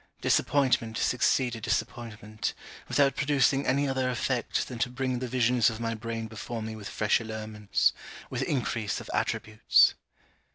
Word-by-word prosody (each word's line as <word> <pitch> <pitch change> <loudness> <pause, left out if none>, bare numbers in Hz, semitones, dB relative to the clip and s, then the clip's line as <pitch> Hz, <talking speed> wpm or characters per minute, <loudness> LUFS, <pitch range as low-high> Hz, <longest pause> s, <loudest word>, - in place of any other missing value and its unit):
Disappointment 130 -5 +2
succeeded 125 -1 +1
disappointment, 110 -1 -3 0.3
without 140 -1 +3
producing 140 -1 +2
any 140 +2 +2
other 130 -1 0
effect 125 -1 -1
than 125 -3 -7
to 125 0 +1
bring 130 0 -2
the 130 - -3
visions 125 -1 +3
of 110 -1 -6
my 115 -1 -1
brain 115 0 -4
before 110 +1 -6
me 110 0 -5
with 105 -2 -7
fresh 110 0 +2
allurements, 110 -2 0 0.3
with - - -4
increase 115 -5 -1
of - - -9
attributes. 110 0 +3
115 Hz, 140 wpm, -28 LUFS, 110-130 Hz, 0.3 s, without